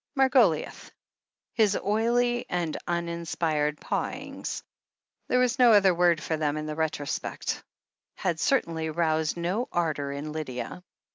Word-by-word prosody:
Margoliouth. 255 - +3 0.6
His 215 -4 +3
oily 240 +4 +1
and 170 -3 -1
uninspired 170 -3 -1
pawings - - -4 0.3
— - - -54
there 250 - +2
was 250 +1 +2
no 240 -2 +7
other 195 -3 +6
word 175 -2 +3
for 160 - -1
them, 150 -1 0
in 155 - -3
the 155 0 -4
retrospect 160 -2 -2 0.3
— - - -65
had 170 -3 +1
certainly 165 - +1
roused 160 0 0
no 185 +9 -1
ardour 155 -5 -1
in 145 +2 -5
Lydia. 150 +1 -5
170 Hz, 135 wpm, -27 LUFS, 155-210 Hz, 0.6 s, no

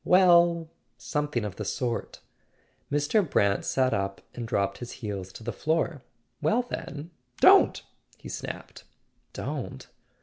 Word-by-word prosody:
"Well—something 170 - +2
of 100 -3 -6
the 105 - -3
sort." 120 +3 -3 0.7
Mr. 145 +9 +3
Brant 100 -4 +2
sat 130 -1 +1
up 100 0 -1
and 120 -2 -5
dropped 100 -3 0
his 120 - -7
heels 100 -5 -5
to - - -10
the 120 - -3
floor. 160 -2 0 0.4
"Well, 190 +12 +2
then— 160 -9 -6 0.3
don't!" - - +6 0.3
he - - -11
snapped. - - -7 0.5
"Don't - - -5
130 Hz, 125 wpm, -27 LUFS, 105-165 Hz, 0.7 s, don't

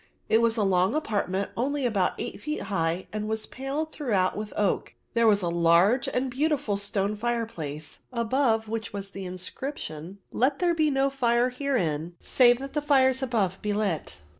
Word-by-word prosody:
It 225 - +5
was 230 0 +2
a 215 - +2
long 190 +4 +2
apartment 200 -8 -1
only 275 +3 -1
about 205 -6 +1
eight - - -5
feet 300 +5 -3
high, 170 -2 -1
and 215 0 -3
was 220 0 -2
panelled 280 +4 -4
throughout 205 -11 0
with 210 0 -5
oak. 205 -3 0 0.2
There 230 -1 +4
was 205 -3 +4
a - - 0
large 170 +8 +4
and 255 +1 -1
beautiful 275 -5 0
stone 200 0 -1
fireplace, 210 -10 -3
above 235 -1 +1
which 225 0 -4
was 200 -1 -5
the 195 -1 -6
inscription, 185 - -6
"Let 270 +3 +2
there 350 +1 +2
be 310 -2 +2
no 270 0 +2
fire 245 -2 +2
herein 175 - -1
save 245 -2 +4
that 275 +2 -7
the 300 - 0
fires 265 -3 +3
above 215 -8 0
be 210 0 -1
lit." 200 -6 -2
225 Hz, 175 wpm, -27 LUFS, 195-265 Hz, 0.2 s, It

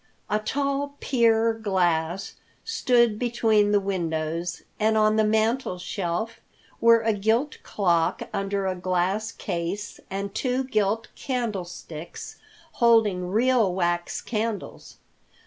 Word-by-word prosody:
A 210 - +2
tall 280 +4 -2
pier 230 -3 +3
glass 185 -4 0 0.3
stood 240 - +2
between 225 -4 +2
the 205 - +4
windows, 170 -3 -2 0.2
and 220 0 +3
on 215 0 +4
the 220 - +3
mantel 220 0 +1
shelf 185 +4 -3 0.4
were 230 0 +6
a 225 0 +1
gilt 220 +8 0
clock 175 -3 +1
under 195 0 -1
a 190 - 0
glass 185 +3 -1
case, 185 +3 -4
and 195 +1 -4
two 255 +2 0
gilt 215 -2 0
candlesticks 185 - -5 0.3
holding 215 - +3
real 230 0 +3
wax 175 -1 -1
candles. 220 -2 -4
210 Hz, 115 wpm, -25 LUFS, 185-230 Hz, 0.4 s, were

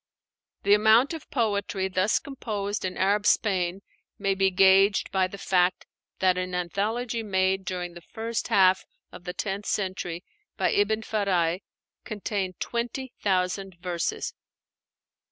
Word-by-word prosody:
The 200 - +5
amount 220 +7 +5
of 320 - -8
poetry 205 -5 0
thus 190 +2 +2
composed 215 -8 -4
in 185 - -4
Arab 205 +2 +2
Spain 190 -2 +1 0.3
may 195 -1 +1
be 195 0 +2
gauged 195 +1 +4
by 190 -1 +2
the 200 - -9
fact 180 -2 +1 0.3
that 185 -1 +2
an 185 0 -3
anthology 220 +7 -1
made 190 -2 0
during 180 -1 -4
the 175 - -11
first 225 +5 -4
half 190 -1 +4 0.3
of 175 - -12
the 180 - -4
tenth 200 0 -3
century, 185 -3 -2 0.3
by - - +2
Ibn 215 +2 +1
Fáraj, 185 -5 0 0.4
contained 200 -4 -3
twenty 240 +2 -3
thousand 190 -1 0
verses. 175 -2 -2
195 Hz, 135 wpm, -26 LUFS, 185-210 Hz, 0.4 s, The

